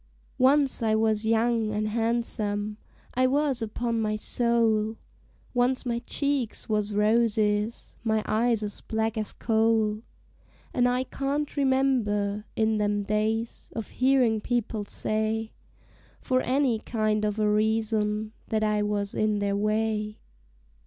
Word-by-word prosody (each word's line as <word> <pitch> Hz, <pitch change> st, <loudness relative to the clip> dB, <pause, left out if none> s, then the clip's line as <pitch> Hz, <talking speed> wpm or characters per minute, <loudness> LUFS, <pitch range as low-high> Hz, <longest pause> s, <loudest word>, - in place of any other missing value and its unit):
Once 270 Hz, 0 st, +3 dB
I 220 Hz, -1 st, +2 dB
was 220 Hz, 0 st, +1 dB
young 225 Hz, -1 st, +2 dB
an' 215 Hz, 0 st, -1 dB
han'some 215 Hz, -2 st, -1 dB, 0.4 s
I 255 Hz, +1 st, +3 dB
was, 275 Hz, -2 st, +1 dB
upon 230 Hz, +1 st, -2 dB
my 215 Hz, -1 st, 0 dB
soul 225 Hz, -1 st, +1 dB, 0.6 s
Once 255 Hz, +2 st, +1 dB
my 235 Hz, -1 st, -1 dB
cheeks 280 Hz, -5 st, -1 dB
was 210 Hz, -1 st, 0 dB
roses, 210 Hz, 0 st, +1 dB
my 220 Hz, -2 st, +1 dB
eyes 225 Hz, 0 st, +2 dB
as 205 Hz, -1 st, -6 dB
black 220 Hz, 0 st, -1 dB
as 215 Hz, -2 st, -2 dB
coal; 220 Hz, -1 st, +1 dB, 0.7 s
And 245 Hz, -1 st, +3 dB
I 250 Hz, +1 st, +1 dB
can't 280 Hz, +3 st, -3 dB
remember, 240 Hz, -7 st, +1 dB
in 220 Hz, -1 st, +1 dB
them 205 Hz, 0 st, 0 dB
days, 215 Hz, +3 st, -2 dB
of 225 Hz, -, -4 dB
hearin' 255 Hz, -4 st, +2 dB
people 225 Hz, -3 st, -2 dB
say, 220 Hz, +2 st, -2 dB, 0.7 s
For 255 Hz, 0 st, +1 dB
any 255 Hz, -3 st, +1 dB
kind 215 Hz, -1 st, -1 dB
of 210 Hz, 0 st, -1 dB
a 215 Hz, -1 st, +2 dB
reason, 215 Hz, 0 st, +1 dB, 0.2 s
that 215 Hz, -1 st, 0 dB
I 210 Hz, -1 st, +1 dB
was 205 Hz, -1 st, -1 dB
in 215 Hz, -1 st, +1 dB
their 200 Hz, -1 st, 0 dB
way. 215 Hz, 0 st, -1 dB
220 Hz, 130 wpm, -27 LUFS, 210-235 Hz, 0.7 s, Once